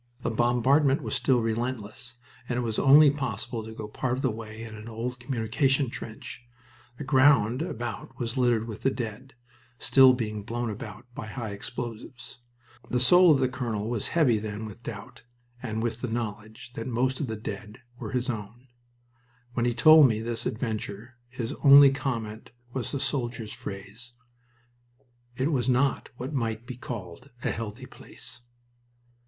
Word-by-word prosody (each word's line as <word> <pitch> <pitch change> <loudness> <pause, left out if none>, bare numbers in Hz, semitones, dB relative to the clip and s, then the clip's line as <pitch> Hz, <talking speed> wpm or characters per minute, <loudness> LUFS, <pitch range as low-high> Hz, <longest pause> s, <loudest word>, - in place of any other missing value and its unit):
The - - 0
bombardment 130 +5 +3
was - - -3
still 130 -3 +2
relentless, 120 +1 -3 0.3
and 120 - 0
it 125 - 0
was 110 -2 -1
only 145 +1 +8
possible 120 -4 -3
to 110 - -8
go 110 -1 -7
part 125 +4 -2
of 130 - -3
the 130 - +2
way 110 0 -8
in 110 -1 -8
an 110 +1 -9
old 120 +3 -4
communication 125 +2 +1
trench. 110 0 -8 0.6
The - - -5
ground 130 -3 +4
about 120 - -5
was 120 -1 -3
littered 120 -3 +2
with 110 -1 -7
the 135 - +3
dead, 125 +1 -6 0.4
still 130 0 +6
being 110 -4 -3
blown 115 +2 -3
about 105 +2 -8
by 110 - -6
high 110 -1 -5
explosives. 120 +4 -7 0.5
The 125 - +1
soul 175 +8 +6
of 140 - +4
the 130 - +3
colonel 120 -4 -3
was 115 -4 -1
heavy 130 -10 +3
then 105 0 -5
with 110 +2 -10
doubt 110 -3 -8 0.4
and 110 0 -3
with 120 0 -2
the 125 - -2
knowledge 110 0 -5
that 115 -1 -5
most 130 +2 0
of 145 - -2
the 110 - -3
dead 105 -1 -6
here 125 - -28
were 115 -4 -5
his 125 -1 -1
own. 120 +2 -6 0.8
When 120 -1 0
he 120 - 0
told 155 +4 +8
me 110 -3 0
this 115 0 -3
adventure 110 0 -4
his 125 -2 -4
only 140 0 +9
comment 115 -6 -4 0.2
was 130 -3 -3
the 140 - -2
soldier's 120 -6 -2
phrase, 105 +5 -8 1.2
"It 135 +5 +1
was 130 -4 +1
not 130 +2 +1
what 130 +5 -5
might 115 -3 -2
be 125 - -7
called 115 -1 -8
a - - +1
'healthy' 115 +3 -5
place." 120 -1 -11
120 Hz, 170 wpm, -27 LUFS, 110-130 Hz, 1.2 s, only